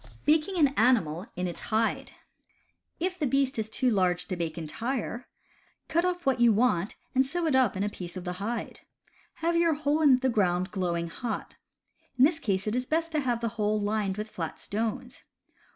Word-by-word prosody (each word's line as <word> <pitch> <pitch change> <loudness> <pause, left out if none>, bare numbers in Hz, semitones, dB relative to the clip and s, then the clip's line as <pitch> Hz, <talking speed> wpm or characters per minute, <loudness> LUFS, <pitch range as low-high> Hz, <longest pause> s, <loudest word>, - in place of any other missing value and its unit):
Baking 315 +5 +2
an 295 -4 +5
Animal 220 - +2
in 180 - -2
its 175 -2 -5
Hide. 225 0 -1 0.4
— - - -44
If 370 0 -7
the 300 - +1
beast 270 -1 +1
is 215 0 -2
too 250 +2 +1
large 180 -3 +1
to 185 - -1
bake 165 -2 -3
entire, 235 - -4 0.6
cut 340 +2 +2
off 355 -1 -2
what 260 -2 +2
you 240 -1 +6
want 210 -4 +1 0.2
and 265 0 +4
sew 335 +6 -2
it 305 -4 +2
up 255 -7 +3
in 195 - 0
a - - +1
piece 180 -3 -6
of 180 - -6
the 180 0 -3
hide. 230 +3 -4 0.7
Have 340 0 +2
your 335 -2 +3
hole 300 +1 0
in 285 -4 +7
the 260 +1 0
ground 185 -6 +1
glowing 175 -3 -1
hot. 230 +6 -5 0.6
In 255 - +7
this 320 +2 +1
case 195 -9 -1
it 215 +2 -1
is 250 0 -1
best 330 +1 0
to 310 - +1
have 245 -4 -1
the 230 - 0
hole 210 +1 +2
lined 205 -1 -1
with 210 +1 -3
flat 165 -6 -5
stones. 225 +4 -4
230 Hz, 200 wpm, -28 LUFS, 190-275 Hz, 0.7 s, in